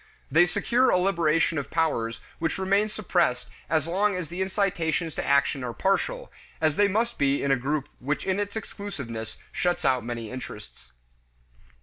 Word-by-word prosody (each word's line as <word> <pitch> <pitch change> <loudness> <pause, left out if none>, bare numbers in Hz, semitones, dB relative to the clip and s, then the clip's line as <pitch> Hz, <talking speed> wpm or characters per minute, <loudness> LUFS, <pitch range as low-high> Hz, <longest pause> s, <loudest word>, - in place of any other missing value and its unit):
They 170 +5 +6
secure 245 +9 +2
a - - +4
liberation 165 -4 +2
of 140 0 -6
powers 115 -9 0 0.2
which 165 -1 -1
remain 200 +3 +2
suppressed 175 -11 0 0.2
as 155 -1 +2
long 195 +4 +1
as 180 -4 -4
the 175 +2 -4
incitations 180 -4 0
to - - -3
action 140 -1 +2
are 120 -1 -3
partial, - - 0 0.3
as 155 -2 +2
they 205 +3 +4
must 225 +4 0
be 140 0 +2
in 140 - +1
a - - +6
group 140 +3 -1
which 145 +4 -2
in 190 +1 0
its 205 +1 -3
exclusiveness 130 - -6
shuts 175 -2 0
out 130 -2 +3
many 115 -2 -5
interests. 105 - -9
165 Hz, 165 wpm, -26 LUFS, 135-195 Hz, 0.3 s, They